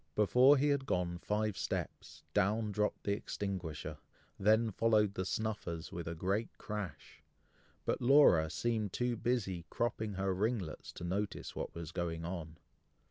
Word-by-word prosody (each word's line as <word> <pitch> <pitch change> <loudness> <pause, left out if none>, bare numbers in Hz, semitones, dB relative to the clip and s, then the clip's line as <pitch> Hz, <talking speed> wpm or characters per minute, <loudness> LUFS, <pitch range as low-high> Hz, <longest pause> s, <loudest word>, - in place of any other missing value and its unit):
Before 125 +7 +6
he 145 +2 +3
had 140 -1 +1
gone 85 -4 0
five 105 +1 -1
steps, - - -4
down 105 +2 +2
dropped 105 +1 -1
the 100 - 0
extinguisher, 85 -7 -4 0.4
then 110 +3 +4
followed 105 -1 +3
the 95 -2 -2
snuffers 100 -7 -3
with 85 -1 -5
a 85 - -3
great 100 +7 0
crash, 105 -6 -6 0.6
but - - 0
Laura 120 - +6
seemed 110 +2 -1
too 120 -1 0
busy 105 -7 -1
cropping 110 -3 -1
her 95 0 0
ringlets, 100 -3 -2
to - - -8
notice 100 +3 -3
what - - -4
was 85 -2 -6
going 85 -2 -3
on. 85 -2 -5
100 Hz, 145 wpm, -34 LUFS, 85-110 Hz, 0.6 s, Before